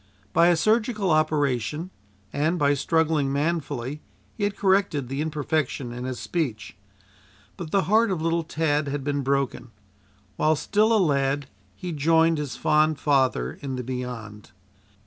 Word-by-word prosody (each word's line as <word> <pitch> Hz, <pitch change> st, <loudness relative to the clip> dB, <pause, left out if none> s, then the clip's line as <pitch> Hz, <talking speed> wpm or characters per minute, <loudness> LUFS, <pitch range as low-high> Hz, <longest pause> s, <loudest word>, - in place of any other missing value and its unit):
By 170 Hz, -, +5 dB
a 175 Hz, -, +5 dB
surgical 215 Hz, 0 st, +1 dB
operation, 155 Hz, -, 0 dB, 0.4 s
and 155 Hz, +5 st, +1 dB
by 145 Hz, -3 st, +3 dB
struggling 155 Hz, -1 st, +1 dB
manfully, 145 Hz, -2 st, -2 dB, 0.3 s
he 205 Hz, -, -2 dB
had 205 Hz, -1 st, -3 dB
corrected 190 Hz, -9 st, +1 dB
the 135 Hz, +2 st, -2 dB
imperfection 150 Hz, -4 st, -2 dB
in 125 Hz, +1 st, -6 dB
his 130 Hz, -1 st, -4 dB
speech. 120 Hz, -, -3 dB, 0.8 s
But 170 Hz, -, -7 dB
the 195 Hz, +3 st, +2 dB
heart 215 Hz, +7 st, +3 dB
of 185 Hz, -4 st, -1 dB
little 165 Hz, +1 st, 0 dB
Tad 155 Hz, -2 st, 0 dB
had 140 Hz, 0 st, -3 dB
been 145 Hz, 0 st, -1 dB
broken. 135 Hz, -2 st, -1 dB, 0.7 s
While 155 Hz, +1 st, +3 dB
still 210 Hz, +8 st, +1 dB
a 225 Hz, -, +5 dB
lad 140 Hz, -5 st, +1 dB, 0.3 s
he 180 Hz, -, -6 dB
joined 160 Hz, +1 st, +3 dB
his 145 Hz, -5 st, -4 dB
fond 155 Hz, 0 st, +2 dB
father 130 Hz, -, +1 dB
in 135 Hz, -2 st, -4 dB
the 125 Hz, -, -4 dB
Beyond. 120 Hz, -4 st, -6 dB
150 Hz, 145 wpm, -25 LUFS, 135-165 Hz, 0.8 s, By